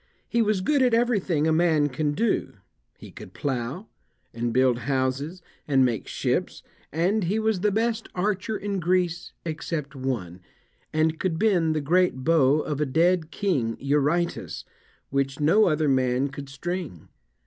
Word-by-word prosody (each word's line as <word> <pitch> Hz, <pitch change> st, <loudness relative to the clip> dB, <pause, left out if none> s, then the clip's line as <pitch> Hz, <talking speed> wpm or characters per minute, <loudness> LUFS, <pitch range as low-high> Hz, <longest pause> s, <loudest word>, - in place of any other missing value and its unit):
He 235 Hz, -, +1 dB
was 210 Hz, -3 st, +1 dB
good 280 Hz, +8 st, +2 dB
at 250 Hz, -3 st, +4 dB
everything 200 Hz, -10 st, +1 dB
a 160 Hz, -, +3 dB
man 160 Hz, -3 st, +3 dB
can 145 Hz, +2 st, -1 dB
do; 225 Hz, +7 st, 0 dB, 0.4 s
he -, -, -12 dB
could 95 Hz, -, -12 dB
plough, 135 Hz, -, -3 dB, 0.5 s
and 120 Hz, 0 st, -2 dB
build 125 Hz, -1 st, +3 dB
houses, 140 Hz, +6 st, -1 dB, 0.2 s
and 135 Hz, -3 st, +4 dB
make 115 Hz, -4 st, -2 dB
ships, -, -, -2 dB, 0.3 s
and 180 Hz, +6 st, +1 dB
he 195 Hz, +6 st, 0 dB
was 220 Hz, -3 st, +1 dB
the 210 Hz, +3 st, +2 dB
best 225 Hz, +2 st, -1 dB
archer 205 Hz, +3 st, -1 dB
in 200 Hz, -1 st, -3 dB
Greece, 175 Hz, 0 st, 0 dB
except 155 Hz, -3 st, -4 dB
one, 115 Hz, -10 st, -4 dB, 0.5 s
and 155 Hz, +1 st, +1 dB
could 175 Hz, -4 st, -1 dB
bend 175 Hz, -7 st, +2 dB
the 155 Hz, -, 0 dB
great 165 Hz, -3 st, +2 dB
bow 150 Hz, -2 st, +4 dB
of 150 Hz, -1 st, -3 dB
a -, -, +2 dB
dead 165 Hz, +3 st, +2 dB
king, 140 Hz, -, -1 dB
Eurytus, 150 Hz, +5 st, 0 dB, 0.5 s
which 140 Hz, 0 st, -1 dB
no 170 Hz, +9 st, +4 dB
other 155 Hz, -2 st, +1 dB
man 130 Hz, 0 st, +2 dB
could 140 Hz, 0 st, -8 dB
string. 165 Hz, -, -5 dB
160 Hz, 155 wpm, -25 LUFS, 135-185 Hz, 0.5 s, at